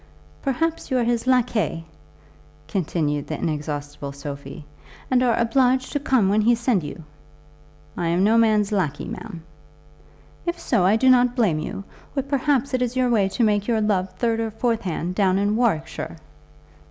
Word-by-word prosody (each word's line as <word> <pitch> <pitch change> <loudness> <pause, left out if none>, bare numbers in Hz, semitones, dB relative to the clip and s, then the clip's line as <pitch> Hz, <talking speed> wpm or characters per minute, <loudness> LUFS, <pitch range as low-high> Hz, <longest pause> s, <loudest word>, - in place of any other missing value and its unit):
"Perhaps 325 +5 -1
you 260 - +1
are 245 - +2
his 235 +1 -1
laquais," 230 -10 +1 0.8
continued 155 -4 -1
the - - -3
inexhaustible 145 -2 -4
Sophie, 140 +1 -8 0.5
"and 255 -1 +4
are 245 -2 +2
obliged 255 +2 +2
to 290 - -1
come 260 -7 +2
when 205 +2 +3
he 235 +3 +4
send 235 -4 +1
you?" 150 +2 -8 0.9
"I 170 - -2
am 170 +3 +2
no 215 +3 +4
man's 215 -3 +3
laquais, 185 -9 -1
ma'am." 190 -8 -8 1.0
"If 345 0 -2
so, 220 - +1
I 205 - +4
do 260 +4 +2
not 250 -1 +5
blame 200 -11 +2
you; 195 - -5 0.3
or, 275 - 0
perhaps, 280 -1 0
it 255 - +1
is 250 0 -1
your 255 -1 +2
way 200 -4 +3
to 235 - -1
make 205 -2 +2
your 230 -2 +2
love 200 -3 +1
third 230 -2 0
or 225 -1 -1
fourth 230 +1 -1
hand 180 -1 -3
down 190 -1 +2
in 205 +1 +1
Warwickshire?" 210 -8 -1
220 Hz, 170 wpm, -23 LUFS, 180-250 Hz, 1.0 s, not